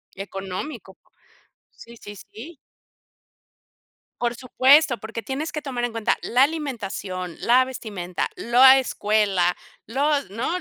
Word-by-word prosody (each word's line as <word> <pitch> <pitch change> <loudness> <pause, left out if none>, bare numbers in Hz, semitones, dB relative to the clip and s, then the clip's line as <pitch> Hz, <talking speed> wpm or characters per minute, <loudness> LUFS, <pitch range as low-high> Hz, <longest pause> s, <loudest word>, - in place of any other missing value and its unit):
Económico, 195 +3 -7
por - - -38 0.6
sí, 235 0 -15
sí, 205 -1 -11
sí. 265 - -12 1.7
Por 240 0 0
supuesto, 260 +2 +4
porque 225 +1 -7
tienes 280 +6 -4
que 305 - -5
tomar 255 -4 -4
en 240 - -4
cuenta 225 -1 0
la 245 +2 +1
alimentación, 205 - -4
la 250 +2 +4
vestimenta, 200 -8 -5
lo 235 +2 0
a 265 0 +9
escuela, 205 -7 +1 0.3
los 280 +1 0
¿no? 230 +4 -3
235 Hz, 125 wpm, -23 LUFS, 200-265 Hz, 1.7 s, a